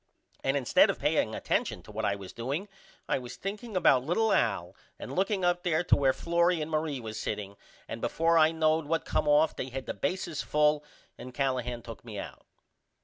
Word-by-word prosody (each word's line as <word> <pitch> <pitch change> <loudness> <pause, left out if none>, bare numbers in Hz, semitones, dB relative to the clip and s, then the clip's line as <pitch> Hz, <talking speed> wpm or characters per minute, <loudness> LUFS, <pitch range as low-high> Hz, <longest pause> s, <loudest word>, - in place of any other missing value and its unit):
And 135 +1 +1
instead 130 -4 +4
of - - 0
paying - - +1
attension 90 - -1
to 105 - -12
what 110 +1 -3
I 100 - +1
was 95 -2 -9
doing 140 - -3 0.4
I - - +1
was 125 -1 -8
thinking 205 +1 -5
about 135 -8 +4
little 210 +9 +1
Al 100 -6 0 0.2
and - - -7
looking 190 0 +1
up 175 0 +2
there 175 -2 +1
to 175 - +4
where 135 -2 +3
Florrie 170 +3 +1
and 155 +1 -4
Marie 155 -3 -1
was 110 -2 -6
setting 100 -2 -4 0.3
and - - -6
before 165 +1 +2
I 155 0 +5
knowed 160 -1 +1
what 165 +1 0
come - - 0
off 150 +2 +4
they 130 - -4
had 130 +1 -5
the - - -3
bases 165 - -2
full 150 0 +2 0.4
and 125 -1 -9
Callahan 125 -3 -1
took 115 -1 -9
me 110 -3 -8
out. - - -8
150 Hz, 205 wpm, -29 LUFS, 120-170 Hz, 0.4 s, I